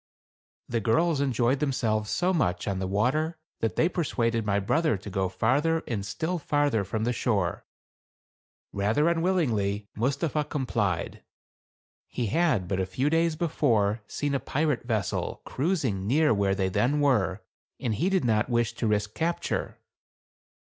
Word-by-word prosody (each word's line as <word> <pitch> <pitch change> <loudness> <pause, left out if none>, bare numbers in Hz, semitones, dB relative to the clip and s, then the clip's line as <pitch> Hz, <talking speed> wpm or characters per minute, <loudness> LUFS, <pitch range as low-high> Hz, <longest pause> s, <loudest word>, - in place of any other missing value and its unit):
The 120 - -1
girls 150 +7 +2
enjoyed 130 -1 +1
themselves 110 -7 0
so 180 +2 +1
much 100 - 0
on 95 -2 -1
the 95 - -2
water 135 - 0 0.2
that 110 -5 -1
they 165 - +3
persuaded 115 -10 0
my 100 0 +2
brother 125 +5 +1
to 100 +2 -9
go 95 0 0
far 120 +9 +2
ther 165 +1 0
and 105 -5 -2
still 165 - -2
farther 145 -7 +1
from 110 +3 -3
the 120 +2 +1
shore. 100 -8 -1 1.1
Father 105 +10 +2
unwillingly, 125 - 0
Mustapha 140 +6 0
complied. 115 - -2 0.9
He 120 - -3
had, 115 - +1
but 95 0 -1
a 95 - 0
few 130 +10 0
days 165 0 +2
before, 115 -10 +1
seen 145 -1 -2
a 140 - +1
pirate 150 -3 -1
vessel 110 -6 -2
cruising 130 - -1
near 150 +4 +4
where 100 -2 +1
they 95 -1 0
then 125 +10 +1
were, 105 -9 +1 0.4
and 115 - -1
he 165 - 0
did 190 -7 +1
not 110 0 +2
wish 120 -1 +1
to 115 - 0
risk 105 0 0
capture. 170 +1 -2
120 Hz, 155 wpm, -27 LUFS, 105-150 Hz, 1.1 s, near